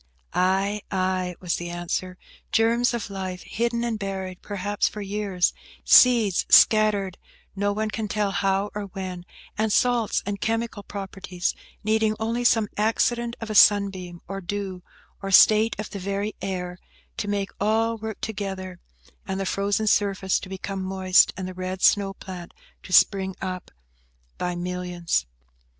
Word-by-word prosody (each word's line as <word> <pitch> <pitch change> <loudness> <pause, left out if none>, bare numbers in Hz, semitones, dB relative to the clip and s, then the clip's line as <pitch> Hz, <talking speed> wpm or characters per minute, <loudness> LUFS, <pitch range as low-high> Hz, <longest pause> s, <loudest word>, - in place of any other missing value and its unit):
"Ay, 195 +3 +1
ay," 185 -2 -1
was 180 -2 -1
the 175 0 -5
answer; 175 +1 -3 0.3
"germs 235 +2 +3
of 235 -4 -4
life, 185 -2 -5
hidden 235 +1 -1
and 230 -2 -2
buried, 190 -2 -5
perhaps, 205 0 -1
for 210 - -6
years; 200 -3 0 0.3
seeds 230 -7 +6
scattered 210 -4 +5 0.4
no 205 +1 0
one 215 +1 -2
can 220 0 -3
tell 205 -1 0
how 195 +1 0
or 210 -1 -4
when; 185 -2 -6 0.3
and 220 0 +1
salts 240 -2 +2
and 200 0 -4
chemical 225 -1 -1
properties, 195 -3 -4 0.3
needing 220 0 +2
only 230 +2 -1
some 225 -3 +3
accident 235 +2 +1
of 225 -1 -5
a - - -2
sunbeam, 195 -4 +4
or 195 +1 -5
dew, 190 0 -4 0.4
or 195 - -4
state 215 +3 +6
of 210 +1 -6
the 200 - -5
very 200 +2 -2
air, 180 -2 -4 0.4
to 205 - -4
make 200 -1 -2
all 225 +2 +1
work 220 0 -6
together, 190 -4 -5 0.5
and 190 0 -2
the 195 - -2
frozen 200 +3 0
surface 195 -2 +2
to - - -10
become 190 0 -5
moist, 185 0 +4
and 185 -1 -4
the 185 - -6
red 185 +1 -5
snow 200 -1 +4
plant 180 -3 -9 0.3
to - - -12
spring 190 0 +4
up 185 -1 -5 0.7
by 180 0 -2
millions." 175 - -2
195 Hz, 150 wpm, -25 LUFS, 185-215 Hz, 0.7 s, seeds